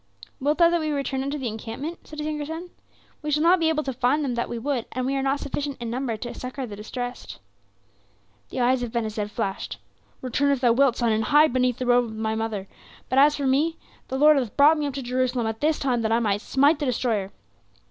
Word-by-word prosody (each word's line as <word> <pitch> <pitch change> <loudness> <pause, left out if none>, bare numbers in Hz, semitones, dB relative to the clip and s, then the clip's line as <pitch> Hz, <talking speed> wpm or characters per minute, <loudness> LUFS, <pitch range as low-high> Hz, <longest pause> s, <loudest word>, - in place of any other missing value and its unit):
"Wilt 290 +3 +1
thou 340 -1 +6
that 345 - +2
we 310 -1 -2
return 275 -2 -1
unto 280 +2 -2
the 265 -4 -3
encampment?" 230 +9 -6
said 305 - -10
his 300 - -3
younger 300 -1 -3
son. 335 +3 -6 0.5
"We 300 - -4
shall 300 +1 +2
not 355 +2 +5
be 325 -1 +2
able 305 -1 0
to 270 - -3
find 260 +5 +1
them 255 - -1
that 235 0 -2
we 235 - -4
would; 250 0 -2
and 255 0 -2
we 270 +1 0
are 270 - 0
not 275 +1 0
sufficient 285 0 -4
in 235 -1 -4
number 245 -2 -2
to 240 +2 -6
succor 255 +1 -5
the 210 -4 -8
distressed." 245 +4 -6 1.1
The - - -3
eyes 250 +1 +3
of 240 -2 -3
Ben 235 -1 -1
Hesed 215 -1 -3
flashed. 200 -3 -4 0.5
"Return 265 +3 +1
if 275 - +1
thou 245 -2 +4
wilt, 265 -1 +3
son, 235 -2 +1
and 220 0 +1
hide 300 -2 +5
beneath 250 -1 +1
the 255 - -3
robe 245 0 +4
of 220 -1 -8
thy 220 0 -1
mother; 220 -3 -3 0.4
but 260 - +3
as 295 +2 +6
for 285 - -3
me, 300 +5 +2 0.3
the 265 - -3
Lord 300 +1 +6
hath 245 -6 -2
brought 300 +2 +6
me 295 - 0
up 275 - -5
to 275 - -4
Jerusalem 250 -1 0
at 220 0 -3
this 310 +1 +2
time 250 -4 0
that 220 -1 0
I 225 - +4
might 205 -3 0
smite 285 +5 +3
the 290 - -1
destroyer." 225 -6 -1
260 Hz, 250 wpm, -25 LUFS, 235-290 Hz, 1.1 s, thou